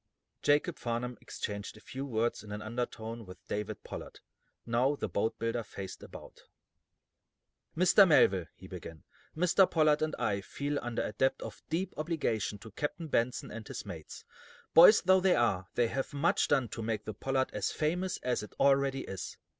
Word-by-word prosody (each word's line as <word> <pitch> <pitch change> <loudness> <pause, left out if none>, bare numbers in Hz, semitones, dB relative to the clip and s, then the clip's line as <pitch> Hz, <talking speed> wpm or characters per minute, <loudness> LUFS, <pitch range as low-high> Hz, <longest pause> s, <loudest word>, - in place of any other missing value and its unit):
Jacob 150 +3 +2
Farnum 120 +1 -2
exchanged 105 0 -5
a - - -12
few 130 +4 -6
words 115 -2 0
in 105 - -10
an 105 - -4
undertone 115 0 -4
with 90 -2 -11
David 105 0 -4
Pollard. - - -8 0.5
Now, 125 +5 +2
the 140 - -3
boat 100 +4 -1
builder 115 +1 -1
faced 100 -3 -8
about. - - -12 1.4
"Mr. 185 +3 +7
Melville," 95 - +4
he - - -13
began, 80 -2 -9 0.3
"Mr. 180 +2 +4
Pollard 155 -2 +3
and 155 0 0
I 100 -1 0
feel 145 +8 -3
under 120 -1 -2
a - - -4
debt 130 +5 +2
of - - -8
deep 175 +4 -1
obligation 145 - -1
to 110 +2 -11
Captain 150 - -4
Benson 120 -1 0
and 110 0 -8
his - - -6
mates. - - -9 0.5
Boys 180 +6 +9
though 190 0 +5
they 185 -1 +4
are, 95 -6 +1
they 120 -2 +2
have 135 +2 -2
done 140 - -6
much 170 - +3
to 130 -5 0
make 110 -1 -2
the 110 - -4
'Pollard' 130 +5 -1
as 100 -2 -1
famous 175 +4 -1
as 125 -1 0
it 105 - -10
already 135 -1 +3
is. 95 - -6
120 Hz, 175 wpm, -31 LUFS, 110-150 Hz, 1.4 s, Boys